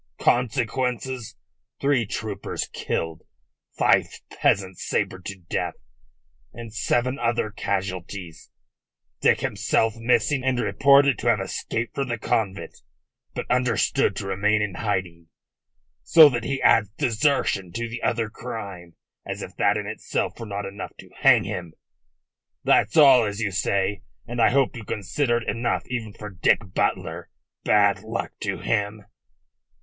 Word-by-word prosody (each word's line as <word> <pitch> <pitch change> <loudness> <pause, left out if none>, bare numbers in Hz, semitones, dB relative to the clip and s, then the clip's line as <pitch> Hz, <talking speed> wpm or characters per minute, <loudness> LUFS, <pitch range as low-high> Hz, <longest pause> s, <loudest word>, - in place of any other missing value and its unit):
Consequences: 125 0 0 0.4
three 140 -6 +2
troopers 105 0 -4
killed, 80 -1 -3 0.6
five - - +4 0.2
peasants 95 -2 0
sabred 95 0 -2
to 100 - -5
death - - -2 0.8
and 115 -3 -9
seven 120 +3 0
other 115 -2 0
casualties, 95 -4 -4 0.7
Dick - - +3
himself 115 -1 +1
missing 125 +3 +1
and 130 -2 +1
reported 140 +1 +4
to - - -3
have 115 -3 +4
escaped 110 +3 -3
from 140 -1 -2
the 120 -1 -2
convent, 105 -3 -2 0.6
but - - -3
understood 125 -3 +2
to - - -4
remain 105 +3 +1
in 100 -3 -3
hiding 90 -5 -3 0.7
so 160 -3 +8
that 120 -3 -3
he 135 0 -1
adds 105 -3 +5
desertion 115 - +1
to 115 +6 -3
the 115 +1 -6
other 115 -1 0
crime, 100 -7 -8 0.3
as - - -5
if - - -9
that 105 - +3
in 105 - -4
itself 110 +2 -3
were 115 - -6
not 100 0 -4
enough 100 +1 -7
to - - -14
hang - - +6
him. 85 -3 -5 0.9
That's - - +3
all, 135 -5 +8
as 105 0 -4
you 110 -3 -1
say, 95 +2 0 0.2
and 120 0 -3
I - - +6
hope 135 0 +2
you 115 - -7
consider 120 +6 -1
it 120 - -6
enough 100 -5 -1
even 115 -4 -4
for 105 0 -9
Dick 95 +2 +1
Butler - - -1 0.3
bad 100 -2 +4
luck 110 +2 -4
to - - -2
him." 105 -1 -2
110 Hz, 140 wpm, -24 LUFS, 100-120 Hz, 0.9 s, so